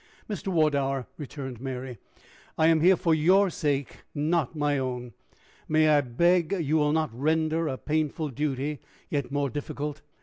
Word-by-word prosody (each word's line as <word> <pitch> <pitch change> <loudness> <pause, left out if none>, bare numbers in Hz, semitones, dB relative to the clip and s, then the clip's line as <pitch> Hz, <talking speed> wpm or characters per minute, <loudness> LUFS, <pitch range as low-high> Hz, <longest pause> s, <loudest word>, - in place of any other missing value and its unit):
"Mr. 205 -1 -5
Wardour," 140 -7 +1
returned 135 -5 -7
Mary, 130 -3 -5 0.6
"I 160 - +3
am 160 -1 +4
here 185 +3 +6
for 165 -2 +1
your 185 +5 +4
sake, 145 -4 -1 0.2
not 155 0 0
my 145 -2 +1
own. 125 -2 -4 0.5
May 155 0 +4
I 150 -1 +5
beg 170 +7 +2
you 160 -1 +1
will 150 -1 +2
not 155 -4 0
render 160 +4 +1
a 130 - -2
painful 155 +1 -1
duty 145 +1 -2 0.3
yet 140 -3 -2
more 140 -2 0
difficult?" 145 0 -5
150 Hz, 155 wpm, -27 LUFS, 135-160 Hz, 0.6 s, here